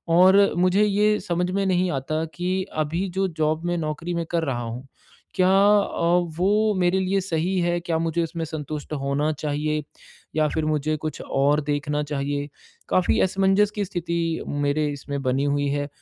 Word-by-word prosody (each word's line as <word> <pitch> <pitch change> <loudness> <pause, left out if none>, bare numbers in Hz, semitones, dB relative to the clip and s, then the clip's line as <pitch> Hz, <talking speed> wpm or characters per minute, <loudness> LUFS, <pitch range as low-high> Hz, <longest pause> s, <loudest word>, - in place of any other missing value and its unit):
और 190 +3 +6
मुझे 185 +3 +3
ये 210 +1 +2
समझ 180 +1 -1
में 195 +1 0
नहीं 180 -1 +1
आता 155 +4 -2
कि 185 +1 -1 0.2
अभी 170 +6 -2
जो 195 - +2
जॉब 155 +2 0
में 175 0 0
नौकरी 165 +2 -3
में 170 -1 -2
कर 165 -1 +1
रहा 125 -5 -2
हूँ 120 +3 -6 0.5
क्या 185 0 +3
अ, 195 -3 +3 0.2
वो 210 +3 +2
मेरे 180 +1 +2
लिए 190 +1 +1
सही 180 +1 -1
है, 175 0 +1
क्या 170 -1 -2
मुझे 165 +1 0
इसमें 165 0 -4
संतुष्ट 155 -1 -6
होना 140 +2 0
चाहिए 150 0 -2 0.5
या 155 -1 +3
फिर 160 -1 -1
मुझे 155 0 0
कुछ 155 +1 -5
और 145 +2 +1
देखना 145 0 -1
चाहिए। 145 0 -3 0.4
काफ़ी 185 - +2
असमंजस 195 +2 +3
की 205 -1 -1
स्थिति 170 -1 -3 0.3
मेरे 145 +1 0
इसमें 140 0 -5
बनी 130 +2 +1
हुई 145 0 +1
है 145 0 -1
165 Hz, 170 wpm, -24 LUFS, 145-185 Hz, 0.5 s, और